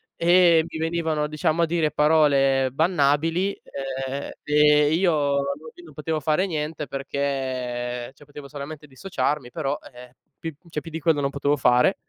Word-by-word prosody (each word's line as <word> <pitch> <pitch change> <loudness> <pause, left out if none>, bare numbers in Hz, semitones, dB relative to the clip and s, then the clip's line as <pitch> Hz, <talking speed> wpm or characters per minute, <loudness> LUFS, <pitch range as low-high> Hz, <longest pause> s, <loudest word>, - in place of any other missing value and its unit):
e 170 -1 +5
mi - - -7
venivano, 160 -2 -1
diciamo, 155 +2 0
a - - +4
dire 160 -2 0
parole 140 -3 +3
bannabili, 165 +4 +1
ehm 135 0 -5
ehm, 150 0 +4
io 175 +1 +3 0.3
alla 140 - +1 0.3
fine 175 - -15
non 155 - -14
potevo 155 +2 -2
fare 155 +5 +1
niente 150 -3 -4
perché 130 -3 -3
cioè, 145 - -18
potevo 145 0 -11
solamente 150 +1 -8
dissociarmi, 145 -3 -3
però, 140 +4 -2 0.2
e 125 - -12
eh, 125 0 -17 0.2
pi 165 -2 -6
cioè 155 -2 -4
più 165 - -9
di 160 - -4
quello 155 -1 +2
non 140 - 0
potevo 140 +1 0
fare. 125 -2 +4
150 Hz, 165 wpm, -24 LUFS, 135-160 Hz, 0.3 s, e